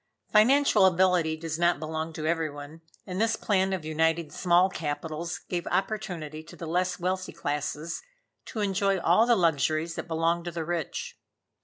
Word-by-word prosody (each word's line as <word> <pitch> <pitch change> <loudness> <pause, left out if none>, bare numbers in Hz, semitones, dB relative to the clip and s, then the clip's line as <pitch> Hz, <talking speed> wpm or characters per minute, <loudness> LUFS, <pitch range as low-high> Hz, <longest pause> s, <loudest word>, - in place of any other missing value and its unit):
Financial 220 -2 +5
ability 180 -3 +2
does 160 0 -4
not 175 -1 +3
belong 160 +1 -4
to 155 0 -5
every 165 -1 0
one, 145 +2 -10 0.2
and 185 +1 -3
this 225 0 +2
plan 195 -3 +1
of 185 -5 -3
uniting 160 0 0
small 180 +2 +3
capitals 160 0 -4
gave 175 -1 -3
opportunity 180 -7 -2
to 155 - -13
the 170 - -7
less 180 +3 0
wealthy 185 +1 -2
classes 150 +3 -3 0.4
to 220 - -5
enjoy 195 -1 +1
all 180 +7 +4
the 240 - +5
luxuries 160 - +1
that - - -6
belong 165 +1 0
to 175 - -4
the 165 -1 -4
rich. 170 -2 -4
170 Hz, 165 wpm, -27 LUFS, 160-190 Hz, 0.4 s, Financial